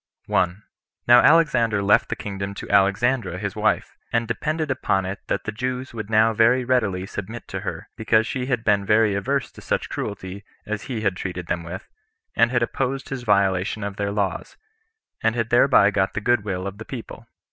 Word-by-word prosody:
1. 90 +3 0 0.4
Now 120 0 +8
Alexander 120 -9 +4
left 100 - +3
the - - -1
kingdom 100 -1 -5
to - - -7
Alexandra 100 +1 +2
his 100 +2 -4
wife, 110 0 0 0.2
and 115 -1 0
depended 150 +7 -2
upon 95 -7 0
it 95 +2 -4
that - - -1
the 110 - -3
Jews 125 +3 -4
would 110 -3 -6
now 110 +1 +4
very 120 +3 +3
readily 105 -8 +1
submit 110 +4 -7
to 95 - -4
her, 90 -4 -6
because 110 0 +2
she 125 +1 -3
had 125 -4 -1
been 100 -2 +2
very 105 +1 +3
averse 130 +7 -1
to - - -14
such - - -2
cruelty 100 -1 -5 0.2
as 105 0 -4
he 120 -5 -4
had 100 -4 0
treated 90 -1 -5
them 85 0 -2
with, 85 +4 -8 0.5
and 115 - +4
had 120 -1 +1
opposed 135 +3 -2
his 135 -2 -4
violation 100 -2 +1
of 100 -1 -5
their 100 0 -1
laws, 100 -3 -3 0.6
and 115 +1 +1
had 115 -1 -2
thereby 120 -4 +5
got 95 -1 0
the - - 0
good 120 0 +2
will 95 -2 -3
of 100 +1 -6
the 110 - -8
people. 125 -4 -8
110 Hz, 195 wpm, -23 LUFS, 100-120 Hz, 0.6 s, Now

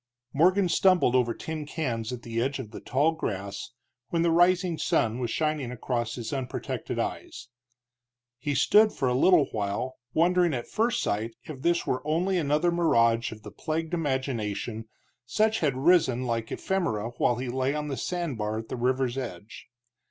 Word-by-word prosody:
Morgan 185 +6 +4
stumbled 180 -6 +4
over 125 -2 +3
tin 155 +5 -5
cans 120 -8 -3
at 125 -1 -6
the 115 0 -2
edge 135 +3 -1
of 120 -6 -7
the - - -7
tall 145 +5 +1
grass 100 -11 -4 0.4
when 170 -1 +1
the 170 - +3
rising 175 0 +3
sun 115 +2 +1
was 120 -2 -2
shining 155 -1 -1
across 120 -1 -2
his 120 0 -5
unprotected 130 -3 -4
eyes. - - -4 0.9
He 145 +3 -2
stood 215 +7 +5
for 135 - -1
a 125 - +2
little 160 +4 +5
while, 105 +5 -3 0.2
wondering 175 -1 +3
at 120 - -4
first 225 +2 0
sight 110 +3 -2
if 145 -4 -9
this 170 +2 +1
were 130 - -1
only 175 +5 +1
another 150 +3 +2
mirage 115 -9 +2
of 110 -1 -10
the - - -9
plagued 160 +1 -3
imagination, 120 - -2 0.4
such 215 - +2
as - - -6
had 130 - -5
risen 135 -5 +3
like 115 -2 -2
ephemera 115 - -1
while 120 - +3
he 125 +2 -4
lay 130 +3 0
on 150 0 -3
the 140 - -3
sand 170 -6 -3
bar 105 +1 -1
at 110 0 -6
the - - -4
river's 130 +1 0
edge. 105 -4 -8
130 Hz, 175 wpm, -27 LUFS, 115-165 Hz, 0.9 s, stood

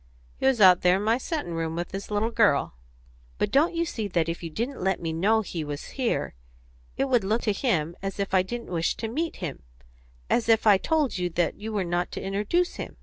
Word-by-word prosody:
"He 265 - +1
was 265 -3 +3
out 185 -3 +7
there 180 +1 +4
in 200 - -3
my 225 +3 +2
settin' 295 - -3
room 165 -1 -2
with 175 +1 -4
his 195 +1 -6
little 210 +2 0
girl." 205 - +3 0.6
"But - - 0
don't 310 +5 +3
you 335 0 +1
see 220 -9 -3
that 170 -4 0
if 165 0 -3
you 165 - -5
didn't 235 - -4
let 190 0 +1
me 165 -1 -3
know 210 +7 +2
he 175 -6 -5
was 145 0 -6
here 255 -4 -1 0.6
it 270 - +2
would 245 -5 +2
look 215 +5 0
to 210 - +1
him 175 - 0
as 195 0 -5
if 195 -1 -2
I 185 - +5
didn't 235 +3 -6
wish 165 -2 0
to 225 - -4
meet 315 +9 -2
him 165 -7 -6 0.7
as 230 -1 +1
if 225 -1 +4
I 215 - +8
had 195 - +3
told 300 - +1
you 180 0 0
that 175 0 -1
you 220 +2 -5
were 205 -3 0
not 175 0 -1
to - - -4
introduce 210 - -1
him?" - - -7
200 Hz, 240 wpm, -26 LUFS, 175-235 Hz, 0.7 s, I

